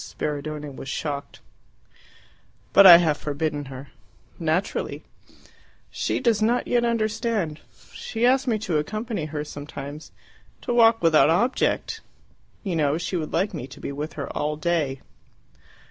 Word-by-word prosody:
Spiridione 150 -1 -5
was 135 - -8
shocked. 145 -1 -5 1.3
"But 200 0 +9
I 175 -2 +12
have 160 -4 +1
forbidden 145 0 -3
her." 135 +1 -9 0.5
"Naturally." 165 +3 -1 0.9
"She - - -1
does 230 -4 +2
not 235 +3 +2
yet 240 -1 +1
understand. 220 -7 -1 0.3
She 230 +1 -2
asked 260 +2 +3
me 225 -3 +2
to 160 -6 +1
accompany 215 +2 -3
her 150 -1 -4
sometimes 145 0 -8 0.5
to 240 - -2
walk 225 -2 +5
without 160 -2 +5
object! 230 +11 0 0.6
You 190 -5 -2
know, 150 -1 +1
she 180 +2 -3
would 155 -3 -3
like 195 +5 0
me 125 - -5
to 130 - -13
be - - -5
with 150 +3 -5
her 140 - -5
all 150 +1 -1
day." 155 -4 -1
160 Hz, 140 wpm, -24 LUFS, 150-215 Hz, 1.3 s, I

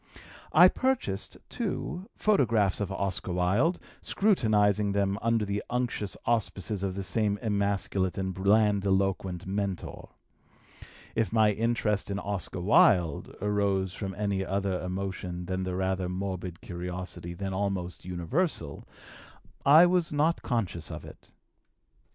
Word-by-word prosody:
I 175 +3 +8
purchased, 245 - -1
too, 180 +3 -4
photographs 115 - +2
of 100 -2 -2
Oscar 95 -2 -2
Wilde, 100 - +2 0.2
scrutinizing 105 - +2
them 100 0 0
under 115 -1 +1
the 100 0 -2
unctuous 120 -4 -2
auspices 105 -3 -1
of 95 -1 -2
this 95 -1 -4
same 105 -2 +1
emasculate 100 -4 -1
and 95 -1 -2
blandiloquent 95 -2 +1
mentor. 95 -1 -4 1.0
If 115 -1 0
my 110 -2 +4
interest 105 -1 0
in 100 - -2
Oscar 100 -3 -4
Wilde 90 - +3
arose 100 -2 +1
from 95 -1 -5
any 100 -2 -1
other 95 -1 -1
emotion 90 -1 -4
than 95 +1 -2
the 90 -1 -3
rather 95 -1 -1
morbid 90 -2 -4
curiosity 90 0 -6
then 95 +1 -4
almost 95 -5 -2
universal, 90 - -2 0.8
I 155 +5 +9
was 175 -2 +2
not 155 +3 +1
conscious 100 - -2
of - - -7
it. - - -14
100 Hz, 120 wpm, -28 LUFS, 95-110 Hz, 1.0 s, I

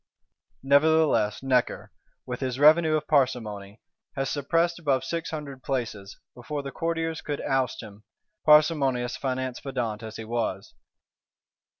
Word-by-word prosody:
Nevertheless 140 -6 +3
Necker, 130 -2 0 0.3
with 125 -1 -5
his 130 -2 -3
revenue 155 +2 +5
of 155 - -1
parsimony, 110 -8 0 0.4
has 135 0 -2
"suppressed 165 +4 0
above 140 -5 +1
six 165 -1 -3
hundred 145 -4 -7
places," 110 -8 -4 0.2
before 140 +4 -5
the 140 - -6
Courtiers 165 0 -2
could 145 -1 -4
oust 130 -3 -1
him; 105 -1 -13 0.4
parsimonious 140 -5 +4
finance 130 -2 -3
pedant 120 -6 -3
as 110 -1 -8
he 110 - -7
was. 110 -4 -3
135 Hz, 125 wpm, -26 LUFS, 120-150 Hz, 0.4 s, revenue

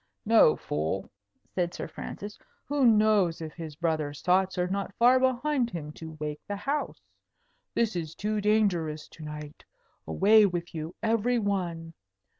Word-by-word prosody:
"No, 220 -8 +6
fool!" 80 +6 -3 0.4
said 175 -2 -1
Sir - - -5
Francis. 205 +1 -8 0.3
"Who 280 -3 +2
knows 210 -6 +4
if 160 -2 -6
his 160 -3 -8
brother 155 -3 -1
sots 185 +3 +1
are 180 - +2
not 195 +1 -3
behind 255 +2 +3
him 155 -7 -6
to 160 0 -10
wake 150 0 -4
the 205 - -3
house? 280 +9 -2 0.8
This 225 -4 +1
is 165 -2 -4
too 210 0 -1
dangerous 185 -8 +1
to 160 - -12
night. 150 -1 -8 0.4
Away 210 +1 +5
with 175 -1 -4
you, 160 +1 -5
every 230 +2 +2
one. 175 -6 -2
185 Hz, 145 wpm, -28 LUFS, 160-215 Hz, 0.8 s, No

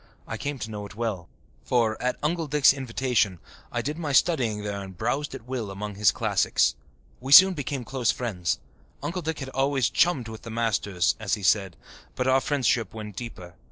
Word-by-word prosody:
I 115 - -4
came 145 +5 -4
to 110 -2 -6
know 105 -1 -5
it 100 - -14
well, 105 -7 -3 0.3
for, 115 -3 +1
at 125 0 0
Uncle 165 +1 0
Dick's 145 -1 +5
invitation, 125 -7 0 0.3
I - - -2
did 150 +3 -3
my 150 -4 -2
studying 125 -9 +2
there 100 -1 -3
and 95 -2 -10
browsed 145 +9 -2
at - - -10
will 125 -5 -4
among 105 +2 -5
his 100 -1 +4
classics. - - +2 0.5
We 130 +2 -6
soon 190 +5 +10
became 140 -4 -4
close 125 0 -1
friends. 100 -8 -1 0.5
Uncle 180 +2 -3
Dick 160 -1 -3
had 135 -2 -6
always 135 -1 +1
"chummed 145 -9 +2
with 110 -1 -8
the 115 - -9
masters," 105 -7 0
as 110 -2 0
he 105 - -10
said, 95 -1 +2 0.4
but 125 - -1
our 130 +1 +4
friendship 125 -6 0
went 105 -2 -7
deeper. 90 -7 -8
120 Hz, 195 wpm, -26 LUFS, 105-135 Hz, 0.5 s, soon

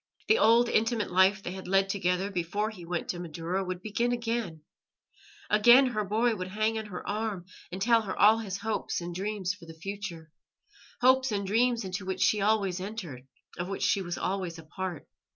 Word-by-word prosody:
The 445 - +4
old, 235 +2 +5
intimate 225 -2 0
life 190 +2 +4
they - - -4
had 190 0 -8
led 195 +1 +3
together 190 0 -1
before 200 +4 -2
he 185 -5 -11
went 175 -1 -3
to 175 - -3
Madaura 175 +3 -3
would 185 -1 -5
begin 235 +3 0
again. 230 -9 -3 0.8
Again 240 +6 +7
her 215 -3 -1
boy 220 +4 +1
would 185 -2 -5
hang 215 +3 0
on 220 - -7
her 180 -3 -8
arm 210 -4 -3 0.3
and 185 - -5
tell 230 +3 +4
her 200 -3 -5
all 215 +2 +6
his 195 -4 -4
hopes 220 +1 -2
and 175 0 -6
dreams 195 0 -2
for 180 -5 -14
the 165 - -10
future 175 -3 -7 0.7
hopes 260 0 +4
and 200 -1 -1
dreams 230 +2 +1
into 185 +1 -4
which 190 0 -1
she 210 - +3
always 200 -3 +1
entered, 175 - -7 0.3
of 175 - -2
which 195 - -4
she 200 - +2
was 175 -2 -4
always 185 -3 -3 0.2
part. 185 -5 -4
195 Hz, 190 wpm, -29 LUFS, 180-220 Hz, 0.8 s, Again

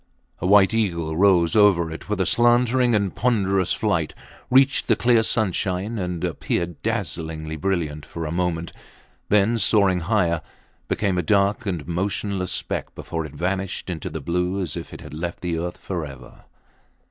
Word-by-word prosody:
A 90 - -1
white 100 +1 +6
eagle 85 -8 -1
rose 90 -1 +4
over 95 -6 +4
it 80 - -9
with 105 -2 -1
a 95 - +2
slanting 120 +3 +3
and 100 -3 0
ponderous 100 -6 +1
flight, - - 0 0.3
reached 135 +1 +4
the - - +4
clear 120 -2 +4
sunshine 105 -1 0
and 90 -2 -3
appeared 85 0 -2
dazzlingly 80 -1 -3
brilliant 80 -3 -2
for 80 +3 -6
a 75 - -4
moment, 85 -1 -2 0.6
then 105 +3 +3
soaring 100 -3 +3
higher, 85 -3 +1 0.5
became 95 -4 0
a - - +2
dark 100 +3 +1
and 85 -6 -3
motionless 95 +1 -2
speck - - -3
before 80 -2 -4
it 75 - -14
vanished 95 +3 -2
into 80 -3 -5
the - - -6
blue 90 +3 -1
as 90 -6 -3
if - - -7
it - - -9
had - - -10
left 85 +2 -5
the 85 -2 -2
earth 85 +1 -4
forever. 70 -9 -7
90 Hz, 160 wpm, -23 LUFS, 85-105 Hz, 0.6 s, white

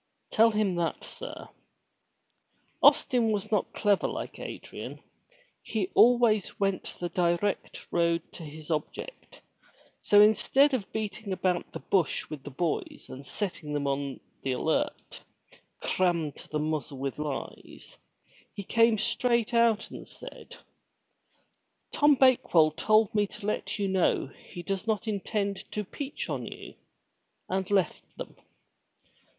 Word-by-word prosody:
Tell 225 +1 +6
him 210 -3 +1
that, 170 -1 -1
sir." - - -8 1.3
Austin 235 -3 +5
was 210 0 -2
not 210 -3 +1
clever 205 -2 +2
like - - -5
Adrian; - - -7 0.6
he 200 -4 -2
always 235 -4 +4
went 195 -1 0
the 175 - -2
direct 175 +3 -1
road 170 -1 +2
to - - -10
his 155 +1 -8
object, 160 - -5 0.6
so 205 - +5
instead 220 +7 +5
of 225 -7 -2
beating 215 -1 -4
about 185 -1 0
the - - -5
bush 185 -5 0
with 150 -3 -6
the 145 - -8
boys 160 +4 -3
and 130 +2 -8
setting 155 -2 -4
them 145 -1 -1
on 140 -1 -2 0.2
the 135 - -1
alert, 125 - -2 0.6
crammed 170 -5 0
to - - -13
the 155 - -1
muzzle 150 -2 -2
with 135 +2 -4
lies, 150 -3 -6 0.6
he 200 - -5
came 230 +2 +4
straight 235 +2 +1
out 230 -2 +3
and - - -9
said, - - -11 1.4
"Tom 295 0 +5
Bake 260 -7 +3
well 155 -2 +7
told 215 +6 +3
me 210 -1 +2
to 210 +1 -10
let 210 -1 -2
you 200 -1 0
know 185 -7 +1 0.2
he 175 - -7
does 195 +2 -3
not 220 0 0
intend 200 -1 -1
to 210 - -2
peach 280 +8 -5
on - - -3
you," - - -9 0.8
and 190 0 -1
left 195 -5 +1
them. - - -7
195 Hz, 135 wpm, -28 LUFS, 170-220 Hz, 1.4 s, well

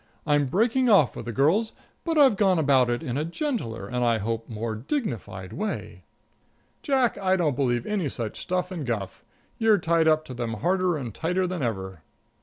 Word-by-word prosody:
I'm 145 -2 +2
breaking 235 - +2
off 190 - +5
with - - -7
the 120 - -3
girls, 165 - +2 0.3
but 330 -2 -1
I've 275 -7 +6
gone 195 -3 +3
about 135 -5 +3
it 120 +5 -1
in 130 -4 -3
a - - 0
gentler 170 - -3
and, 125 0 -1
I 115 -1 +3
hope, 115 +2 -3
more 110 0 -3
dignified, 110 - -4
way." 215 +1 -4 0.8
"Jack, 265 -5 +1
I 190 -1 +2
don't 160 -7 +1
believe 120 -3 0
any 195 -8 -1
such 115 -4 -5
stuff 180 +1 -2
and 170 -5 -4
guff. 110 -7 -4 0.4
You're 225 -2 +5
tied 165 -3 +2
up 155 0 +3
to 130 - -8
them 120 -2 -3
harder 180 - +1
and 120 -7 -6
tighter 180 - 0
than 180 -2 -3
ever." 95 -7 -3
155 Hz, 190 wpm, -25 LUFS, 120-190 Hz, 0.8 s, I've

